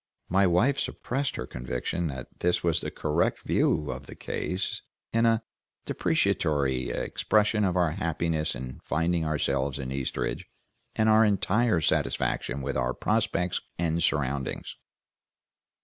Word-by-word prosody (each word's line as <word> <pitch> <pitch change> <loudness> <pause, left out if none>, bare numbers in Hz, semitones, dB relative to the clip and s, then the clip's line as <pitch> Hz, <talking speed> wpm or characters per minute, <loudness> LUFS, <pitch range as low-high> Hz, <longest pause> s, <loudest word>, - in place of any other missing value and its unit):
My 95 +2 +4
wife 120 +11 +3
suppressed 135 +2 -2
her - - -4
conviction 65 +7 -3
that 65 -4 -8
this 90 0 +1
was 85 -2 +2
the - - -3
correct 75 +3 0
view 75 -2 +1
of - - -7
the - - -9
case, 90 +1 -2 0.3
in 115 +1 +4
a 115 0 +2 0.4
deprecatory 65 -4 +1
expression 105 0 +1
of 95 -2 +1
our 85 -3 +3
happiness 80 -1 -1
in 65 0 -7
finding 85 +1 0
ourselves 70 -3 0
in 65 -2 -5
Eastridge, 65 -1 -2 0.5
and 110 - +2
our 110 0 +6
entire 105 -1 +2
satisfaction 70 -2 0
with 70 +1 -2
our 65 -1 0
prospects 90 0 0 0.2
and 85 0 0
surroundings. 70 -3 -1
85 Hz, 135 wpm, -28 LUFS, 70-95 Hz, 0.5 s, our